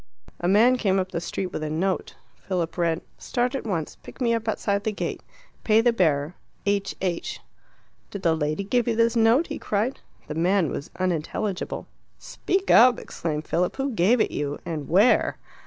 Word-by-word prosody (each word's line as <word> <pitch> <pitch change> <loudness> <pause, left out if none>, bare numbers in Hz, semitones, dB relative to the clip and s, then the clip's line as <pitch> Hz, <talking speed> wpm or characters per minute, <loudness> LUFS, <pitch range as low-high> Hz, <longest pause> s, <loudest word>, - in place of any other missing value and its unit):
A 175 - -1
man 230 +7 +5
came 195 -5 +1
up 185 -1 -1
the 170 - -3
street 180 +1 -4
with - - -3
a 155 - -3
note. 185 +5 -1 0.3
Philip 175 -4 -1
read, 170 -2 0 0.2
"Start 245 +1 -1
at 270 -4 -4
once. 165 -7 -3
Pick - - -13
me 235 -3 +2
up 230 0 -2
outside 200 -2 0
the 220 - 0
gate. 210 - -4 0.4
Pay 215 0 +4
the 240 0 +3
bearer. 155 -6 +1 0.3
H. 200 -1 0
H." 175 -3 -2 0.7
"Did 200 -2 -7
the 165 -2 +3
lady 155 +4 -1
give 240 +4 0
you 230 - +1
this 230 +1 +2
note?" 230 +7 +4
he - - -6
cried. 215 +6 -1 0.3
The 150 - -5
man 175 +1 +2
was 145 - -5
unintelligible. 185 +2 -2 0.3
"Speak 385 +1 -2
up!" 245 +1 +7
exclaimed 155 -2 -4
Philip. 180 +1 0
"Who 270 0 -2
gave 220 +3 +3
it - - +1
you 145 0 -3
and 155 -4 -4
where?" 200 +8 +4
195 Hz, 185 wpm, -25 LUFS, 170-230 Hz, 0.7 s, up